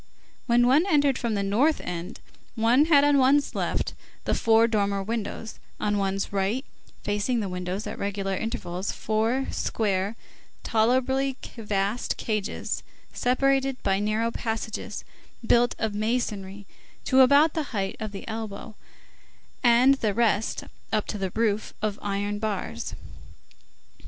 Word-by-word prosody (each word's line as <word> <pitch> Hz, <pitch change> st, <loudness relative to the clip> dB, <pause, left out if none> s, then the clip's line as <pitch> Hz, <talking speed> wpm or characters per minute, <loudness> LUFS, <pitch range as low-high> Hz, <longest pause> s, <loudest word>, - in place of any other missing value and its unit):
When 240 Hz, 0 st, +4 dB
one 285 Hz, +9 st, +4 dB
entered 290 Hz, -6 st, +3 dB
from 230 Hz, -3 st, -1 dB
the 200 Hz, -, 0 dB
north 245 Hz, +11 st, +2 dB
end, 175 Hz, 0 st, -6 dB, 0.3 s
one 235 Hz, +5 st, +4 dB
had 295 Hz, -3 st, +5 dB
on 290 Hz, -1 st, +4 dB
one's 275 Hz, +2 st, +3 dB
left -, -, -1 dB, 0.3 s
the -, -, 0 dB
four 225 Hz, 0 st, +4 dB
dormer 200 Hz, -3 st, 0 dB
windows, 220 Hz, +1 st, -4 dB, 0.2 s
on 205 Hz, -1 st, 0 dB
one's 195 Hz, 0 st, -1 dB
right, 200 Hz, +8 st, 0 dB, 0.4 s
facing 210 Hz, +4 st, 0 dB
the 205 Hz, -, -2 dB
windows, 180 Hz, +2 st, -4 dB
at -, -, -6 dB
regular 195 Hz, -1 st, -2 dB
intervals, 190 Hz, -4 st, -3 dB
four 225 Hz, +5 st, 0 dB
square, 200 Hz, -1 st, -1 dB, 0.5 s
tolerably 260 Hz, +4 st, +1 dB, 0.2 s
vast 205 Hz, 0 st, -1 dB
cages, 215 Hz, -3 st, -2 dB, 0.3 s
separated 270 Hz, +1 st, +1 dB
by 195 Hz, -1 st, +2 dB
narrow 215 Hz, +3 st, 0 dB
passages, 225 Hz, -1 st, -4 dB, 0.4 s
built 240 Hz, +1 st, +4 dB
of 220 Hz, -2 st, -1 dB
masonry 205 Hz, -3 st, -2 dB, 0.4 s
to 260 Hz, -, +3 dB
about 285 Hz, +4 st, +6 dB
the 315 Hz, -2 st, -1 dB
height 195 Hz, -4 st, -2 dB
of 215 Hz, -2 st, -4 dB
the 195 Hz, -, -8 dB
elbow, 220 Hz, -1 st, -6 dB, 0.9 s
and 245 Hz, +3 st, +6 dB
the 210 Hz, -3 st, 0 dB
rest, 220 Hz, -2 st, +1 dB, 0.3 s
up 215 Hz, -1 st, +1 dB
to 210 Hz, -, -5 dB
the 190 Hz, -1 st, -1 dB
roof, 220 Hz, -2 st, 0 dB
of 210 Hz, -1 st, -2 dB
iron 205 Hz, +1 st, -2 dB
bars. 195 Hz, -, -3 dB
220 Hz, 135 wpm, -26 LUFS, 200-250 Hz, 0.9 s, about